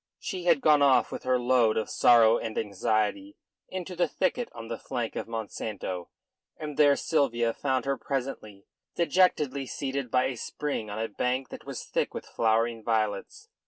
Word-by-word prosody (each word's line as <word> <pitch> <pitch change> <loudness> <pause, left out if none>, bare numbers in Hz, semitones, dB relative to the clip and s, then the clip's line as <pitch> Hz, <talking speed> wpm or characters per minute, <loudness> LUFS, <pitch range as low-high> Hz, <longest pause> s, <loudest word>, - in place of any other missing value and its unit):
She 185 -6 -5
had 165 -5 +4
gone 150 -1 +5
off 140 -2 +4
with - - -5
her 130 0 +3
load 120 -3 +3
of 110 - -1
sorrow 115 -1 +5
and 110 -1 -5
anxiety 110 - -1 0.3
into 185 -1 -5
the 175 - +2
thicket 250 -3 -1
on 115 -1 -9
the 115 -1 -5
flank 120 -2 -4
of - - -4
Monsanto, 105 -5 -5 0.5
and 150 -1 -6
there 145 -1 +5
Sylvia 120 -8 +1
found 130 0 -1
her 140 0 -1
presently, 125 -7 -4 0.3
dejectedly 150 -6 +2
seated 135 -1 -3
by 125 +2 +3
a 130 -2 -2
spring 140 -4 -4
on 105 - -5
a 110 +1 -1
bank 125 +5 -2
that - - -10
was - - -5
thick - - -2
with - - -5
flowering 115 0 0
violets. 110 -3 -2
125 Hz, 170 wpm, -28 LUFS, 110-145 Hz, 0.5 s, gone